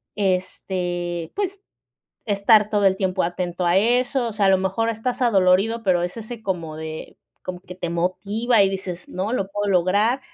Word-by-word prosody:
este, 180 Hz, -3 st, -2 dB
pues, 395 Hz, -1 st, -3 dB, 0.6 s
estar 210 Hz, +1 st, +4 dB
todo 210 Hz, -1 st, +1 dB
el 190 Hz, 0 st, +4 dB
tiempo 190 Hz, -1 st, 0 dB
atento 175 Hz, +1 st, -2 dB
a 175 Hz, +2 st, +4 dB
eso, 245 Hz, +4 st, +2 dB
o 225 Hz, -, -5 dB
sea, 205 Hz, -2 st, +2 dB
a -, -, +5 dB
lo 190 Hz, -, +5 dB
mejor 190 Hz, +5 st, 0 dB
estás 230 Hz, +3 st, -3 dB
adolorido, 210 Hz, 0 st, +3 dB
pero 180 Hz, -4 st, +2 dB
es 180 Hz, +5 st, -4 dB
ese 230 Hz, +1 st, -7 dB
como 170 Hz, -6 st, -3 dB
de 155 Hz, 0 st, -7 dB, 0.3 s
como 180 Hz, -1 st, -6 dB
que 180 Hz, -1 st, -10 dB
te 175 Hz, -2 st, -4 dB
motiva, 200 Hz, +7 st, +1 dB
y 195 Hz, -, +2 dB
dices: 185 Hz, -2 st, -6 dB
"No, 190 Hz, +4 st, -3 dB
lo 195 Hz, -6 st, -1 dB
puedo 205 Hz, 0 st, -2 dB
lograr". 200 Hz, +8 st, +2 dB
195 Hz, 180 wpm, -22 LUFS, 180-220 Hz, 0.6 s, a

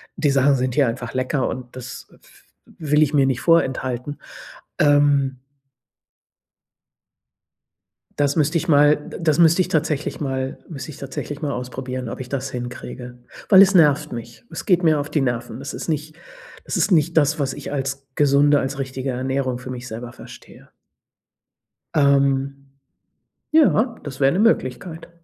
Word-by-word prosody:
die 145 Hz, -, +1 dB
Sachen 140 Hz, +1 st, +3 dB
sind 125 Hz, -1 st, -1 dB
hier 140 Hz, -4 st, +3 dB
einfach 115 Hz, +1 st, -4 dB
lecker. 130 Hz, +1 st, 0 dB
Und 125 Hz, -1 st, -7 dB
das 130 Hz, -1 st, -9 dB
w -, -, -20 dB, 0.5 s
w 150 Hz, -3 st, -9 dB
will 150 Hz, -, +5 dB
ich 150 Hz, -, -1 dB
mir 140 Hz, -2 st, +4 dB
nicht 130 Hz, -2 st, -1 dB
vorenthalten, 130 Hz, -4 st, 0 dB, 0.6 s
ähm 145 Hz, -2 st, +3 dB, 2.8 s
das 145 Hz, -1 st, +1 dB
müsste 155 Hz, +2 st, +2 dB
ich 170 Hz, +2 st, -3 dB
mal 150 Hz, -1 st, +5 dB
d 150 Hz, -, -10 dB
das 155 Hz, -3 st, +2 dB
müsste 170 Hz, +2 st, +5 dB
ich -, -, 0 dB
tatsächlich 155 Hz, -2 st, -1 dB
mal 135 Hz, -2 st, -3 dB
müsste 140 Hz, -5 st, -8 dB
ich 145 Hz, -, -9 dB
tatsächlich 140 Hz, +2 st, -6 dB
mal 145 Hz, -, -1 dB
ausprobieren, 125 Hz, 0 st, -5 dB
ob -, -, -7 dB
ich 130 Hz, -1 st, -7 dB
das 135 Hz, 0 st, -3 dB
hinkriege, 125 Hz, 0 st, -7 dB, 0.3 s
weil 195 Hz, -2 st, +8 dB
es 195 Hz, 0 st, +5 dB
nervt 150 Hz, -3 st, +4 dB
mich. 120 Hz, -, -8 dB
Es -, -, -6 dB
geht 180 Hz, -4 st, +3 dB
mir 155 Hz, -3 st, +3 dB
auf 145 Hz, -, -5 dB
die 150 Hz, -, +1 dB
Nerven. 120 Hz, -2 st, -3 dB
Das 140 Hz, +1 st, -6 dB
ist -, -, -6 dB
nicht 155 Hz, 0 st, -3 dB, 0.5 s
das -, -, -3 dB
ist -, -, +1 dB
nicht 170 Hz, 0 st, +3 dB
das, 155 Hz, 0 st, +2 dB
was 135 Hz, -2 st, -1 dB
ich -, -, -8 dB
als 135 Hz, -1 st, -4 dB
gesunde, 145 Hz, 0 st, +4 dB
als 135 Hz, +1 st, -4 dB
richtige 130 Hz, 0 st, -4 dB
Ernährung 130 Hz, 0 st, -2 dB
für 130 Hz, -, -9 dB
mich 125 Hz, -1 st, -7 dB
selber 120 Hz, +2 st, -7 dB
verstehe. -, -, -14 dB, 1.3 s
Ähm, 140 Hz, -1 st, +1 dB, 0.7 s
ja, 265 Hz, -7 st, +3 dB
das 135 Hz, -3 st, -8 dB
wäre 135 Hz, 0 st, +3 dB
'ne 185 Hz, -, 0 dB
Möglichkeit. 165 Hz, -, 0 dB
140 Hz, 165 wpm, -21 LUFS, 130-150 Hz, 2.8 s, weil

